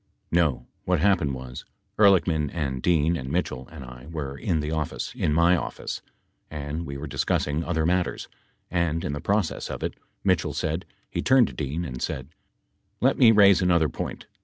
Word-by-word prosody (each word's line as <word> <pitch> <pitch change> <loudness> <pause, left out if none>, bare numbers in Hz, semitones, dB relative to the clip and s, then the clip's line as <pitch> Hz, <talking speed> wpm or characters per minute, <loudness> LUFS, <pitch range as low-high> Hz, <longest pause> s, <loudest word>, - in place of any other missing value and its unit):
No, 80 -8 +2 0.2
what 90 -2 +1
happened 80 -6 +2
was 65 -1 -8 0.2
— - - -29
Ehrlichman 90 -7 +4
and 70 -6 -2
Dean 85 0 +3
and 65 -5 -5
Mitchell 65 -6 -2
and 65 - -9
I 60 +2 -11
were 70 -4 -4
in 85 0 -1
the 75 +1 -2
office, 80 -2 -3
in - - 0
my 85 +3 +5
office, 85 - -4 0.5
and 75 +2 -5
we 70 0 -5
were 70 - -5
discussing 75 +2 0
other 80 -3 0
matters. 90 +1 0 0.4
And 85 -2 0
in 70 - -2
the 70 - -4
process 100 -4 0
of - - -5
it, - - -2 0.3
Mitchell - - +1
said 80 +3 -2
— - - -41
he - - -1
turned 130 -2 +5
to - - -10
Dean 75 +4 -3
and 65 -4 -6
said, 65 +1 -3 0.7
"Let - - +2
me 120 - +8
raise 100 -3 +6
another 85 -4 +3
point. - - -5
80 Hz, 185 wpm, -25 LUFS, 70-90 Hz, 0.7 s, me